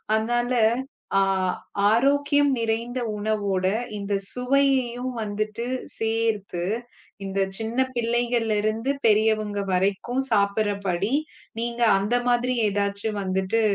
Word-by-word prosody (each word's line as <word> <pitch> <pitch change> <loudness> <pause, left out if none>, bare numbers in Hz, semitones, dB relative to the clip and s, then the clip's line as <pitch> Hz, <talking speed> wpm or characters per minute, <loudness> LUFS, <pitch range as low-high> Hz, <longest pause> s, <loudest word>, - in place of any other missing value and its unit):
அதனால 240 +3 0 0.7
ஆ - - +4 0.7
ஆரோக்கியம் 285 +4 +3
நிறைந்த 230 +2 -1 0.2
உணவோட 205 -3 -1 0.3
இந்தச் 200 -1 -2
சுவையையும் 255 -1 +1
வந்துட்டு 215 +2 -3 0.3
சேர்த்து, 220 -5 -1 0.6
இந்தச் 195 0 -1
சின்னப் 250 +4 -1
பிள்ளைகள்ல 235 -1 +1
இருந்து 225 +5 0 0.2
பெரியவங்க 215 -1 +2
வரைக்கும் 200 +8 0
சாப்பிடுற 205 0 +2
படி 190 +7 0 0.5
நீங்க 235 0 -1
அந்த 210 +5 +1
மாதிரி 245 +1 +2
ஏதாச்சு 200 +1 -1
வந்துட்டு 190 +4 0
220 Hz, 95 wpm, -24 LUFS, 200-240 Hz, 0.7 s, ஆ